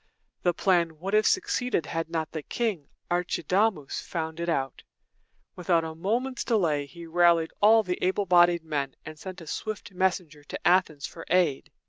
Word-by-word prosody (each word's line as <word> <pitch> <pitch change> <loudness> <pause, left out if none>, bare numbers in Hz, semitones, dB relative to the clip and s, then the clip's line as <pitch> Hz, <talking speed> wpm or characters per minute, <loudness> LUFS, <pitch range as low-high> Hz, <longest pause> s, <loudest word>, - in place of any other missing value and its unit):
The 175 -1 +1
plan 170 -4 +2
would 190 +5 -5
have 215 0 +4
succeeded 250 - 0
had 165 0 -3
not 160 -2 -3
the 155 - -4
king, 195 -5 -2 0.2
Ar 175 0 +2
chi 175 - -3
da´mus, 185 -3 0
found 160 -2 -4
it 170 0 -2
out. 135 -5 -2 0.7
Without 175 -2 +1
a 160 0 -5
moment's 235 +10 -2
delay, 160 - +1
he 170 +3 -11
rallied 170 -1 +3
all 220 +2 +6
the 180 -2 -3
able 190 +2 +1
bodied 175 -2 +4
men, 145 -4 -3
and 155 0 -9
sent 185 0 -8
a - - -10
swift 210 +6 -5
messenger 180 -5 -1
to - - -4
Athens 175 -6 +2
for 165 - -9
aid. 170 -6 +2
175 Hz, 175 wpm, -27 LUFS, 160-190 Hz, 0.7 s, all